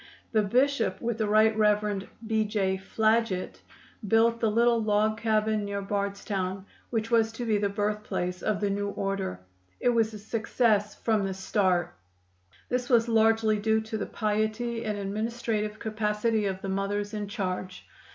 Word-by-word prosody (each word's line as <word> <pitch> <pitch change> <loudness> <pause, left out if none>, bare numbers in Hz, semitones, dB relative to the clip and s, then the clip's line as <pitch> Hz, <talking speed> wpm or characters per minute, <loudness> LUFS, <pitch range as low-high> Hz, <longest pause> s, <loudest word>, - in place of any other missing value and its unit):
The 220 - +3
Bishop, 240 -1 +1
with 235 -1 -2
the 215 - +1
Right 215 +1 +4
Rev. 210 -2 +1 0.2
B. 220 0 +1
J. 200 -3 0
Flaget, 215 0 0 0.5
built 230 +2 +3
the 225 - +2
little 235 +1 +3
log 215 0 +1
cabin 215 -1 +1
near 200 0 -3
Bardstown 195 -1 -2 0.2
which 225 -1 -2
was 225 -1 +3
to 240 +1 -5
be 215 -2 +2
the 200 -1 +1
birthplace 205 -3 -2
of 210 -2 0
the 205 -1 +1
new 205 0 -1
order. 195 - -3 0.4
It - - +2
was 225 -2 +2
a - - -5
success 215 -1 0
from 220 -3 0
the 190 -1 -2
start. 190 -2 +1 0.7
This 250 0 -2
was 235 -2 +4
largely 225 -1 +3
due 220 +1 +2
to 220 0 -5
the - - -3
piety 220 +2 -1
and 210 -1 -2
administrative 215 +1 -2
capacity 215 0 0
of 190 -1 -4
the 195 - -3
mothers 205 +2 -2
in 210 -1 -3
charge. 185 -3 -4
215 Hz, 160 wpm, -28 LUFS, 200-225 Hz, 0.7 s, Right